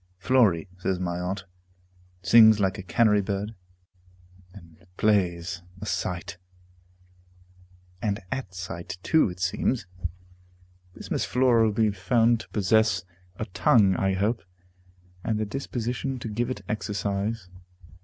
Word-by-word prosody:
"Flory," 100 Hz, -4 st, +3 dB
says 95 Hz, -1 st, -1 dB
my 85 Hz, -1 st, -2 dB
aunt, 95 Hz, +2 st, -3 dB, 0.8 s
"sings 110 Hz, +1 st, +7 dB
like 95 Hz, 0 st, 0 dB
a -, -, -3 dB
canary 105 Hz, +4 st, +3 dB
bird, 100 Hz, +2 st, -3 dB, 1.0 s
and 85 Hz, -3 st, -16 dB
plays 90 Hz, -3 st, +1 dB, 0.2 s
a 105 Hz, -, -6 dB
sight," 90 Hz, -3 st, -3 dB, 1.6 s
and 105 Hz, -3 st, -1 dB
at 130 Hz, -8 st, -3 dB
sight 90 Hz, -1 st, -6 dB
too, 160 Hz, -9 st, +3 dB
it 90 Hz, 0 st, -9 dB
seems. 95 Hz, +7 st, 0 dB, 1.1 s
This -, -, -10 dB
Miss -, -, 0 dB
Flora 125 Hz, -2 st, +3 dB
will 110 Hz, -, +2 dB
be 110 Hz, 0 st, +2 dB
found 115 Hz, +4 st, +2 dB
to 110 Hz, -, -11 dB
possess 105 Hz, -2 st, +2 dB, 0.3 s
a 110 Hz, -, -4 dB
tongue, 100 Hz, -1 st, +3 dB
I 95 Hz, +1 st, +1 dB
hope, 105 Hz, +5 st, 0 dB, 0.8 s
and 110 Hz, -, 0 dB
the 110 Hz, -, 0 dB
disposition 125 Hz, +2 st, -3 dB
to 120 Hz, -, -6 dB
give 120 Hz, +3 st, -1 dB
it 130 Hz, -, -5 dB
exercise. 100 Hz, 0 st, -2 dB
100 Hz, 125 wpm, -26 LUFS, 95-115 Hz, 1.6 s, sings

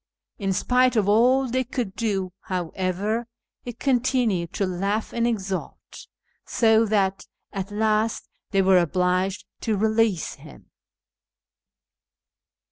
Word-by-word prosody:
In 195 Hz, -2 st, -1 dB
spite 250 Hz, +6 st, +2 dB
of 210 Hz, -3 st, +2 dB
all 250 Hz, +6 st, +4 dB
they 260 Hz, +2 st, 0 dB
could 240 Hz, -6 st, -4 dB
do, 195 Hz, -5 st, -2 dB
however, 185 Hz, +5 st, -2 dB, 0.3 s
he 245 Hz, -, -6 dB
con 260 Hz, +1 st, +1 dB
tinued 230 Hz, -9 st, 0 dB
to 200 Hz, -, 0 dB
laugh 195 Hz, +4 st, -2 dB
and 235 Hz, 0 st, +1 dB
exult, 195 Hz, -5 st, -3 dB, 0.7 s
so 225 Hz, -1 st, +3 dB
that 195 Hz, -2 st, 0 dB, 0.3 s
at 195 Hz, -1 st, -4 dB
last 215 Hz, +1 st, 0 dB, 0.2 s
they 195 Hz, -2 st, +2 dB
were 190 Hz, -1 st, +5 dB
obliged 180 Hz, +3 st, 0 dB
to 220 Hz, -3 st, -1 dB
release 220 Hz, -3 st, +1 dB
him. -, -, -15 dB
210 Hz, 120 wpm, -24 LUFS, 190-230 Hz, 0.7 s, were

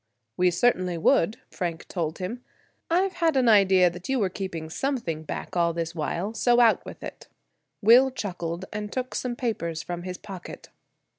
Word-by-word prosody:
"We 180 Hz, 0 st, +3 dB
certainly 180 Hz, -2 st, +1 dB
would," 165 Hz, +6 st, +3 dB
Frank 170 Hz, -2 st, -4 dB
told 160 Hz, -3 st, -3 dB
him; 225 Hz, +7 st, -5 dB, 0.5 s
"I've 370 Hz, +3 st, +2 dB
had 325 Hz, -4 st, +3 dB
an 255 Hz, -2 st, +3 dB
idea 190 Hz, -4 st, +6 dB
that 175 Hz, +5 st, -9 dB
you 265 Hz, -, +2 dB
were 200 Hz, -6 st, +1 dB
keeping 175 Hz, -5 st, -5 dB
something 230 Hz, -, -2 dB
back 155 Hz, -, -6 dB
all 170 Hz, -1 st, +2 dB
this 165 Hz, 0 st, -3 dB
while; 170 Hz, +6 st, -2 dB
so 240 Hz, +1 st, +3 dB
out 230 Hz, -2 st, +5 dB
with -, -, -10 dB
it." -, -, -8 dB, 0.6 s
Will 245 Hz, +5 st, +7 dB
chuckled, 180 Hz, -7 st, -4 dB
and 210 Hz, 0 st, -4 dB
took 255 Hz, -1 st, -3 dB
some 245 Hz, -1 st, -2 dB
papers 170 Hz, -10 st, -2 dB
from 175 Hz, -1 st, -5 dB
his 180 Hz, 0 st, -5 dB
pocket. 195 Hz, -4 st, -10 dB
190 Hz, 170 wpm, -26 LUFS, 170-240 Hz, 0.6 s, Will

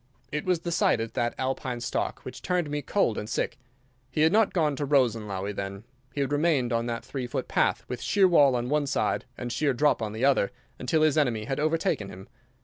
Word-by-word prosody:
It 150 Hz, 0 st, -3 dB
was 180 Hz, -3 st, +1 dB
the 170 Hz, -, -3 dB
sight 165 Hz, -, +3 dB
of 115 Hz, 0 st, -4 dB
that 120 Hz, 0 st, -1 dB
Alpine 130 Hz, -2 st, -2 dB
stock 120 Hz, -, -2 dB
which -, -, -8 dB
turned 175 Hz, -4 st, -1 dB
me 150 Hz, 0 st, -1 dB
cold 145 Hz, -, +1 dB
and 105 Hz, -, -6 dB
sick. 130 Hz, -, -2 dB, 0.5 s
He 150 Hz, -, -1 dB
had 160 Hz, +1 st, +5 dB
not 215 Hz, +1 st, +4 dB
gone 155 Hz, -5 st, +1 dB
to 145 Hz, -, -1 dB
Rosenlaui, 110 Hz, -8 st, +1 dB
then. 100 Hz, +1 st, -5 dB, 0.3 s
He 140 Hz, -, -3 dB
had 140 Hz, 0 st, -1 dB
remained 145 Hz, -5 st, +2 dB
on 115 Hz, +1 st, 0 dB
that 115 Hz, -1 st, -4 dB
three 130 Hz, -3 st, -4 dB
foot -, -, -3 dB
path, -, -, +1 dB
with 125 Hz, -1 st, -5 dB
sheer 195 Hz, -2 st, +4 dB
wall 145 Hz, -7 st, +5 dB
on 120 Hz, 0 st, -1 dB
one 145 Hz, +1 st, +1 dB
side 135 Hz, -, 0 dB
and 120 Hz, 0 st, -4 dB
sheer 140 Hz, +2 st, +1 dB
drop 145 Hz, -1 st, +2 dB
on 110 Hz, -2 st, -2 dB
the 110 Hz, +5 st, -1 dB
other, 135 Hz, -8 st, +3 dB, 0.3 s
until 155 Hz, +5 st, +1 dB
his 155 Hz, -1 st, +4 dB
enemy 120 Hz, -7 st, +1 dB
had 135 Hz, +5 st, -2 dB
overtaken 155 Hz, -10 st, 0 dB
him. 95 Hz, +1 st, -11 dB
135 Hz, 225 wpm, -27 LUFS, 115-150 Hz, 0.5 s, had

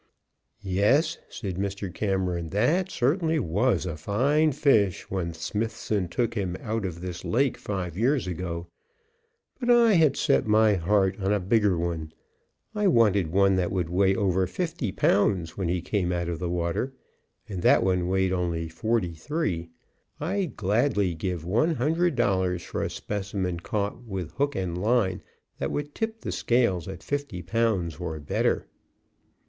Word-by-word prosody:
"Yes," 100 Hz, -, +2 dB
said 95 Hz, -6 st, -5 dB
Mr. 100 Hz, -1 st, -3 dB
Cameron, 90 Hz, -4 st, -1 dB
"that 150 Hz, -, +1 dB
certainly 160 Hz, +3 st, +1 dB
was 115 Hz, -, +1 dB
a 85 Hz, -4 st, -3 dB
fine 135 Hz, -, +2 dB
fish 110 Hz, -, +2 dB
when 90 Hz, -3 st, -2 dB
Smithson 105 Hz, -1 st, -2 dB
took 115 Hz, +6 st, -1 dB
him 95 Hz, -5 st, -2 dB
out 110 Hz, -2 st, -2 dB
of 85 Hz, -1 st, -7 dB
this 90 Hz, -1 st, -6 dB
lake 130 Hz, +2 st, +1 dB
five 90 Hz, -5 st, -4 dB
years 125 Hz, +4 st, +1 dB
ago; 85 Hz, -1 st, -4 dB, 0.9 s
but 245 Hz, -2 st, -2 dB
I 235 Hz, -2 st, +6 dB
had 155 Hz, -6 st, +4 dB
set -, -, +2 dB
my 110 Hz, 0 st, +5 dB
heart 95 Hz, +2 st, +1 dB
on 95 Hz, 0 st, 0 dB
a 105 Hz, -, +2 dB
bigger 100 Hz, -1 st, +2 dB
one. 85 Hz, -2 st, -3 dB, 0.6 s
I 210 Hz, -2 st, +1 dB
wanted 105 Hz, -, +4 dB
one 95 Hz, +1 st, +4 dB
that 90 Hz, -1 st, 0 dB
would 90 Hz, -3 st, -1 dB
weigh 95 Hz, +1 st, +3 dB
over 95 Hz, -3 st, +1 dB
fifty 160 Hz, -, -3 dB
pounds 95 Hz, -4 st, +1 dB
when 95 Hz, -4 st, -2 dB
he 90 Hz, 0 st, -1 dB
came 90 Hz, -3 st, 0 dB
out 85 Hz, -1 st, -1 dB
of 85 Hz, -2 st, -3 dB
the 90 Hz, -1 st, -2 dB
water, 85 Hz, +9 st, -1 dB, 0.5 s
and 95 Hz, -5 st, -5 dB
that -, -, +5 dB
one 90 Hz, -2 st, +1 dB
weighed 95 Hz, 0 st, +1 dB
only 85 Hz, -2 st, -1 dB
forty 90 Hz, +1 st, -1 dB
three. 85 Hz, -, -2 dB, 0.5 s
I'd 180 Hz, -, -2 dB
gladly 105 Hz, -2 st, +1 dB
give 85 Hz, 0 st, -4 dB
one 120 Hz, -, +2 dB
hundred 160 Hz, +5 st, +1 dB
dollars 95 Hz, -6 st, +1 dB
for -, -, -4 dB
a -, -, -1 dB
specimen 95 Hz, -3 st, -3 dB
caught 105 Hz, +5 st, -3 dB
with 95 Hz, -7 st, -5 dB
hook 140 Hz, +1 st, -1 dB
and 90 Hz, -3 st, -2 dB
line 100 Hz, -3 st, +1 dB, 0.4 s
that -, -, -1 dB
would 145 Hz, 0 st, -4 dB
tip 225 Hz, 0 st, -3 dB
the -, -, -4 dB
scales 115 Hz, -8 st, +1 dB
at 95 Hz, -3 st, -8 dB
fifty 140 Hz, -11 st, -3 dB
pounds 95 Hz, -5 st, 0 dB
or 80 Hz, -3 st, -4 dB
better." 75 Hz, -, 0 dB
100 Hz, 160 wpm, -26 LUFS, 90-120 Hz, 0.9 s, I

